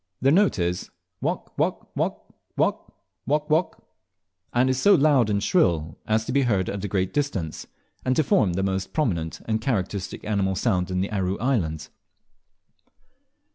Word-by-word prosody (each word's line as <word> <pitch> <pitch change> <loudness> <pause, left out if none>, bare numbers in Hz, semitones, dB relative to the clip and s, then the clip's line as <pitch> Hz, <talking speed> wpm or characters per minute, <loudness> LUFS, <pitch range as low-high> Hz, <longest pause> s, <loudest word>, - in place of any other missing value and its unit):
Their 135 - +3
note 195 - +4
is, 90 0 -2 0.3
"Wawk - - -3
wawk - - -2
wawk - - -3 0.2
Wok - - 0 0.4
wok 150 +2 0
wok," 160 +3 0 0.6
and 125 +2 +3
is 130 0 0
so 200 -1 +6
loud 140 -7 +4
and 100 -1 0
shrill 85 - +2
as 110 0 +1
to 125 - -3
be 140 +2 +3
heard 100 -8 +1
a 100 0 -3
great 95 -1 -1
distance, 100 - -2 0.4
and 130 0 +1
to 155 - +3
form 100 -8 +2
the 95 +2 -1
most 95 0 -2
prominent 85 - -1
and 110 -1 -1
characteristic 100 -5 -2
animal 100 -3 0
sound 95 -3 0
in 90 0 0
the 100 - -2
Aru 95 -2 -1
Islands. 85 - -1
105 Hz, 160 wpm, -25 LUFS, 95-130 Hz, 0.6 s, so